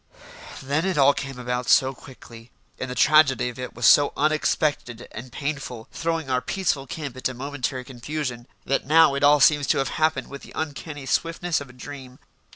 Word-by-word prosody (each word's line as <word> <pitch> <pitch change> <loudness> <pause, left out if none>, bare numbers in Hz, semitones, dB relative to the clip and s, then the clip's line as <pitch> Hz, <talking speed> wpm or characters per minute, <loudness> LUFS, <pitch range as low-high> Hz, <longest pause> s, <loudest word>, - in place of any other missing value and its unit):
Then 140 +4 0
it 190 -3 -1
all 140 0 +6
came 135 -2 -6
about 125 0 -3
so 135 0 +4
quickly, 120 -3 -14 0.3
and 130 - -4
the 125 - -5
tragedy 135 -5 +4
of 125 - -10
it 125 - -6
was 120 0 -2
so 145 +5 +6
unexpected 150 -5 0
and 120 +3 -9
painful, 135 -5 -5
throwing 165 -2 -2
our 130 -1 0
peaceful 155 -7 -1
camp 140 -3 -6
into 130 0 -3
momentary 135 0 -4
confusion, 125 -1 -5 0.2
that 135 0 -1
now 160 -1 +6
it 140 - -2
all 145 +1 +6
seems 145 0 +4
to - - +2
have 135 - 0
happened 155 0 +1
with 140 0 -9
the - - -13
uncanny 145 -1 -5
swiftness 165 +2 -1
of 140 - -9
a - - -14
dream. 130 0 -10
140 Hz, 185 wpm, -24 LUFS, 125-150 Hz, 0.3 s, all